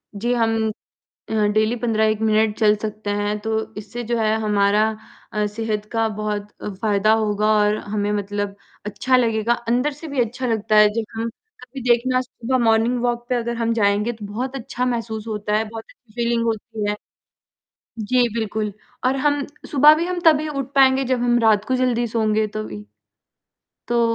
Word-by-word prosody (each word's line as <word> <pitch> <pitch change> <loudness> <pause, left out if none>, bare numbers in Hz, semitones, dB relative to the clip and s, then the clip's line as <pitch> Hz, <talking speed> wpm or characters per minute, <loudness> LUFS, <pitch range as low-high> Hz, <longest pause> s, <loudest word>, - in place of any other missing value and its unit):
जी, 240 +4 -1
हम 225 -2 +1 0.6
अ, - - -3 0.2
daily 215 +2 +2
15-1 220 -2 +1
minute 215 -1 +2
चल 210 -2 +5
सकते 215 -1 -4
हैं, 205 +1 -1
तो 220 0 -3
इससे 215 +4 -6
जो 235 +1 -1
है 215 0 +2
हमारा 210 0 +2 0.4
अ, 210 0 0
सेहत 210 0 -3
का 225 -1 +1
बहुत 210 -1 -3
अ, - - -4
फ़ायदा 210 +1 +2
होगा 210 0 0
और 210 0 +3 0.2
हमें 205 -1 0
मतलब 205 0 -3 0.3
अच्छा 255 +5 +1
लगेगा। 230 -1 +1 0.2
अंदर 250 +5 +1
से 295 +4 -10
भी 280 -3 -1
अच्छा 245 +2 -2
लगता 220 -2 +1
है 210 0 +8
जब 225 0 -2
हम 230 +1 -2 0.3
कभी 255 +2 -9
देखना 245 +2 +3
है 255 - +3
सुबह 255 +1 -2
मॉर्निंग 230 +2 +3
वॉक 240 0 -1
पे 250 - +1
अगर 235 0 -2
हम 230 0 0
जाएँगे 210 +1 +2
तो 220 -2 -10
बहुत 250 +6 -4
अच्छा 250 0 -3
महसूस 230 -3 -3
होता 210 -1 -1
है, 220 - +1
बहुत 225 0 -8 0.3
फ़ीलिंग 235 -1 0
होती 225 -1 -3
है। 210 - -2 1.0
जी 245 +3 +2
बिल्कुल, 215 -1 -2 0.3
और 260 +1 +3
हम 290 -1 +1 0.3
सुबह 295 +2 +7
भी 335 - -1
हम 360 0 -2
तभी 310 -1 +5
उठ 275 -2 -4
पाएँगे 265 0 +5
जब 255 -1 0
हम 240 0 +3
रात 215 -2 +4
को 260 - 0
जल्दी 245 -2 +1
सोंगे 215 -1 +1
तभी। 110 -1 -5 1.1
तो 240 0 +2
225 Hz, 180 wpm, -21 LUFS, 210-245 Hz, 1.1 s, है